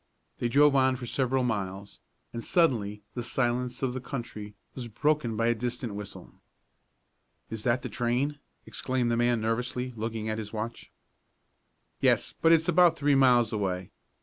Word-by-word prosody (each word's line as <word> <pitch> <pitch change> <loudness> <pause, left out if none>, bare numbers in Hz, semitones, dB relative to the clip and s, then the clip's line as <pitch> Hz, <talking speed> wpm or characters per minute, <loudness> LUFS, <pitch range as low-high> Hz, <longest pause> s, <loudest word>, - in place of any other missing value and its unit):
They 120 - 0
drove 145 +2 +5
on 130 -1 +4
for 125 -1 -6
several 130 +1 0
miles, 100 -4 -3 0.3
and 115 -1 -5
suddenly 110 - +1
the 120 - -3
silence 125 +1 -1
of 125 -2 0
the 130 - -4
country 115 -6 -6 0.2
was 125 -3 -6
broken 125 0 0
by 115 - +1
a 120 - +4
distant 120 -1 -4
whistle. 100 -1 -9 1.1
"Is 110 -1 -4
that 120 +1 +1
the - - -3
train?" 130 +5 -1 0.3
exclaimed 125 -2 -1
the - - +2
man 120 0 +2
nervously, 125 +3 -2
looking 110 0 -4
at 110 0 -2
his 105 -1 -6
watch. 110 +1 -5 1.1
"Yes, - - +2
but 165 - +5
it's 165 -1 +4
about 175 -1 +5
three 145 -1 +2
miles 125 -4 +4
away. 95 -4 -2
120 Hz, 160 wpm, -28 LUFS, 110-130 Hz, 1.1 s, drove